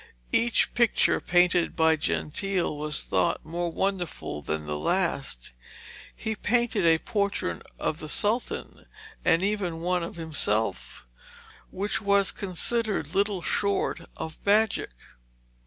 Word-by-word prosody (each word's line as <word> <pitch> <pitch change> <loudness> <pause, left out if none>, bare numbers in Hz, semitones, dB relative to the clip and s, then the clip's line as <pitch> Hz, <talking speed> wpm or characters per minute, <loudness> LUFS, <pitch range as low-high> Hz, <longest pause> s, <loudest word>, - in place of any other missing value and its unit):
Each 235 0 +2
picture 235 -3 +3
painted 175 -1 +3
by 160 0 +4
Gentile 170 +3 -1
was 150 0 -1
thought 170 - 0
more 170 +1 -2
wonderful 175 - -2
than 75 +1 -3
the 75 0 -2
last. 140 - -1 0.6
He 220 - -3
painted 225 -4 +1
a 165 0 +6
portrait 200 - -2 0.2
of 155 - -2
the 155 - -6
Sultan, 220 +9 -1 0.4
and 165 +1 +3
even 195 -5 -1
one 180 +1 +1
of 170 - -5
himself, 110 - -1 0.6
which 200 +3 -2
was 200 -1 +3
considered 200 -3 -1
little 200 -2 +1
short 200 -3 0 0.2
of 160 -1 -6
magic. 210 +1 +2
180 Hz, 120 wpm, -27 LUFS, 160-200 Hz, 0.6 s, a